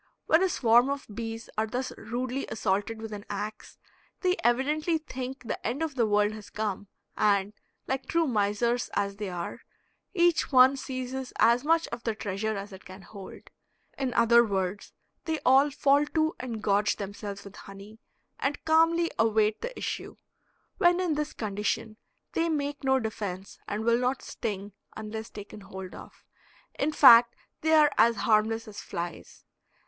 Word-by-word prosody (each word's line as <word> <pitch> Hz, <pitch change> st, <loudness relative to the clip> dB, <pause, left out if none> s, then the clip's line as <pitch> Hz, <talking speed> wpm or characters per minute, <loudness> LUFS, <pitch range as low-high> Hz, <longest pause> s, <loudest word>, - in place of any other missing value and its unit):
When 320 Hz, +3 st, +4 dB
a 380 Hz, -, +3 dB
swarm 240 Hz, -3 st, +4 dB
of 280 Hz, 0 st, -3 dB
bees 225 Hz, 0 st, -5 dB
are 220 Hz, -, +1 dB
thus 250 Hz, +4 st, -3 dB
rudely 250 Hz, +4 st, -4 dB
assaulted 215 Hz, +2 st, -2 dB
with 220 Hz, -1 st, -6 dB
an 205 Hz, -1 st, -7 dB
ax, 210 Hz, +1 st, -6 dB, 0.4 s
they 365 Hz, -1 st, +2 dB
evidently 300 Hz, +7 st, +2 dB
think 265 Hz, -4 st, -7 dB
the 230 Hz, -, -5 dB
end 255 Hz, +8 st, -2 dB
of 320 Hz, -3 st, -3 dB
the 240 Hz, -4 st, +1 dB
world 210 Hz, 0 st, +2 dB
has 215 Hz, -1 st, -10 dB
come, 205 Hz, -2 st, -3 dB, 0.3 s
and, 205 Hz, -1 st, +2 dB, 0.3 s
like 265 Hz, -1 st, -2 dB
true 335 Hz, 0 st, +2 dB
misers 235 Hz, 0 st, 0 dB
as 200 Hz, 0 st, -1 dB
they 205 Hz, -2 st, -4 dB
are, 175 Hz, -1 st, -5 dB, 0.5 s
each 345 Hz, -3 st, +3 dB
one 260 Hz, +1 st, +7 dB
seizes 260 Hz, -1 st, -5 dB
as 235 Hz, +2 st, +4 dB
much 330 Hz, +2 st, +2 dB
of 235 Hz, 0 st, -6 dB
the 225 Hz, -2 st, -1 dB
treasure 210 Hz, +1 st, -3 dB
as 200 Hz, +1 st, -7 dB
it 190 Hz, -, -11 dB
can 190 Hz, +1 st, -12 dB
hold; 195 Hz, +1 st, -12 dB, 0.4 s
in 265 Hz, -2 st, -2 dB
other 235 Hz, +1 st, +6 dB
words 195 Hz, -2 st, -2 dB, 0.3 s
they 320 Hz, -1 st, -1 dB
all 270 Hz, +3 st, +6 dB
fall 285 Hz, +1 st, +3 dB
to 315 Hz, 0 st, +2 dB
and 230 Hz, -4 st, -5 dB
gorge 205 Hz, 0 st, +2 dB
themselves 200 Hz, 0 st, -6 dB
with 200 Hz, 0 st, -12 dB
honey, 200 Hz, +3 st, -12 dB, 0.4 s
and 285 Hz, +1 st, -2 dB
calmly 330 Hz, +1 st, +3 dB
await 220 Hz, -1 st, +2 dB
the -, -, -5 dB
issue. -, -, -4 dB, 0.6 s
When 350 Hz, -2 st, +4 dB
in 360 Hz, -4 st, +1 dB
this 300 Hz, 0 st, -2 dB
condition 215 Hz, +1 st, -3 dB, 0.3 s
they 335 Hz, 0 st, 0 dB
make 285 Hz, -2 st, -2 dB
no 265 Hz, 0 st, +3 dB
defense 200 Hz, -4 st, -5 dB
and 210 Hz, +2 st, -3 dB
will 235 Hz, 0 st, +3 dB
not 250 Hz, +2 st, -1 dB
sting 205 Hz, -3 st, -5 dB, 0.2 s
unless 220 Hz, +1 st, -6 dB
taken 205 Hz, 0 st, -10 dB
hold 190 Hz, -1 st, -9 dB
of. -, -, -13 dB, 0.5 s
In 295 Hz, +3 st, +1 dB
fact 240 Hz, -5 st, +8 dB, 0.3 s
they 320 Hz, +1 st, +2 dB
are 305 Hz, -2 st, +6 dB
as 230 Hz, +1 st, +5 dB
harmless 220 Hz, +2 st, +1 dB
as 210 Hz, -1 st, -8 dB
flies. 175 Hz, -2 st, -7 dB
230 Hz, 165 wpm, -28 LUFS, 205-275 Hz, 0.6 s, fact